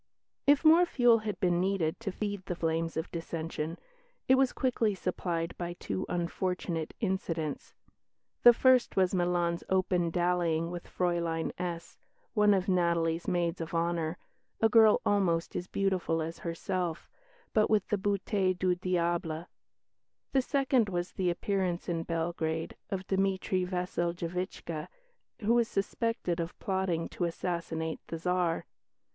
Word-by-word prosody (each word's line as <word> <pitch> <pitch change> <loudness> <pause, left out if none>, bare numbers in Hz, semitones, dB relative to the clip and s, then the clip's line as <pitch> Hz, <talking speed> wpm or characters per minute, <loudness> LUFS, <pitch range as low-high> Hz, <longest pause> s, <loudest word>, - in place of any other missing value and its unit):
If 285 +2 +5
more 335 +3 +7
fuel 240 -6 +4
had 210 -4 -4
been 175 -1 +2
needed 185 -3 0
to 220 -4 -3
feed 205 -1 -4
the 180 - -2
flames 165 -1 -1
of 160 - -3
dissension, 165 -1 -4 0.5
it 260 - +6
was 265 -1 +4
quickly 230 -5 +1
supplied 175 -2 -2
by 175 0 -3
two 100 - -4
unfortunate 175 -1 -2
incidents. 170 -7 -2 0.7
The 240 - +10
first 255 +1 +4
was 185 -1 +3
Milan's 175 -1 +1
open 185 -2 +2
dallying 175 -1 +1
with 175 -1 -6
Fräulein 170 -2 -1
S, 170 -2 -5 0.3
one 210 -2 +5
of 190 0 -1
Natalie's 170 -2 +1
maids 175 -1 0
of 165 +1 -5
honour, 165 0 0 0.4
a 225 - +5
girl 220 -1 +6
almost 180 -5 +1
as 180 - -3
beautiful 190 -5 0
as 165 +1 -4
herself, 170 0 -3 0.5
but 215 -1 +3
with 210 -3 +2
the 210 - +2
beauté 195 -1 0
de 185 0 +2
diable. 170 -2 -1 0.9
The 270 - +3
second 265 -5 +2
was 175 -1 -2
the 185 -2 0
appearance 185 0 -1
in 170 -2 -1
Belgrade 165 -1 -2
of 190 -2 -3
Dimitri 190 -1 0
Wasseljevitchca, 175 -2 -3 0.5
who 220 +2 +3
was 235 -1 +3
suspected 195 -3 -1
of 170 +1 -4
plotting 190 -4 -1
to 175 - -2
assassinate 165 -2 -3
the 165 - -4
Tsar. 175 0 0
180 Hz, 140 wpm, -30 LUFS, 170-195 Hz, 0.9 s, The